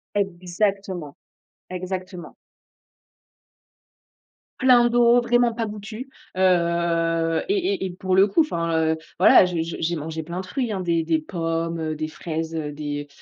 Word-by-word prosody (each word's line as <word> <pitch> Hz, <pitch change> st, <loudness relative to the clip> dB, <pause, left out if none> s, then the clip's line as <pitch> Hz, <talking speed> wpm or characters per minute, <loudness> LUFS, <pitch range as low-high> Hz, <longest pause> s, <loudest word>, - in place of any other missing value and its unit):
Exactement, 185 Hz, -3 st, -2 dB, 0.5 s
exactement. 185 Hz, 0 st, -6 dB, 2.2 s
Plein 245 Hz, -2 st, +5 dB
d'eau, 240 Hz, 0 st, +5 dB
vraiment 240 Hz, 0 st, +2 dB
pas 225 Hz, 0 st, -2 dB
goûtus, 215 Hz, +4 st, -7 dB, 0.3 s
heu 170 Hz, -2 st, +1 dB
et 395 Hz, -1 st, +1 dB
et 380 Hz, -, -3 dB
et -, -, -3 dB
pour 185 Hz, +1 st, -1 dB
le 195 Hz, +2 st, +6 dB
coup, 210 Hz, +11 st, +3 dB
enfin, 165 Hz, -, 0 dB
heu, -, -, -5 dB, 0.2 s
voilà, 185 Hz, -, +7 dB
je 180 Hz, -1 st, -4 dB
j'ai 165 Hz, -, -6 dB
j'ai 170 Hz, +1 st, 0 dB
mangé 160 Hz, +1 st, -5 dB
plein 170 Hz, +3 st, -6 dB
de 190 Hz, -, -5 dB
fruits, 235 Hz, +5 st, -2 dB
hein, 195 Hz, -3 st, -2 dB
des 170 Hz, -2 st, 0 dB
des 160 Hz, 0 st, +1 dB
pommes, 165 Hz, 0 st, -3 dB
heu, 155 Hz, -1 st, -2 dB
des 155 Hz, 0 st, -3 dB
fraises, 160 Hz, 0 st, -5 dB
heu, 150 Hz, -2 st, -3 dB
des 145 Hz, 0 st, -5 dB
175 Hz, 150 wpm, -23 LUFS, 165-205 Hz, 2.2 s, voilà